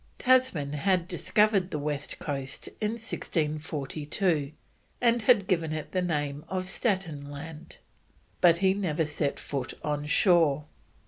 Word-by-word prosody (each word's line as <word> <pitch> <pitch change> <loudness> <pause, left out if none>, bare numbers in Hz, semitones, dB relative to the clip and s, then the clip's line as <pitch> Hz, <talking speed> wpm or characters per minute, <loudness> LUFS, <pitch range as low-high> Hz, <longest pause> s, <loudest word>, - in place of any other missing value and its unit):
Tasman 250 - +2
had 180 +3 +1
discovered 195 +1 +2
the 150 - -3
west 145 0 -3
coast 135 -2 -4 0.2
in 210 +1 0
1642, 155 -5 -1 0.5
and 235 -1 +3
had 220 -3 +4
given 165 -4 0
it 155 -1 -5
the 185 - 0
name 145 -4 -2
of 185 -1 -2
Staten 180 - -1
Land, 150 +2 -9 0.6
but 170 -1 +6
he 190 - +5
never 170 -5 0
set 150 -1 -2
foot 135 -4 -4
on 150 0 -2
shore. 155 -4 +4
160 Hz, 130 wpm, -28 LUFS, 145-190 Hz, 0.6 s, but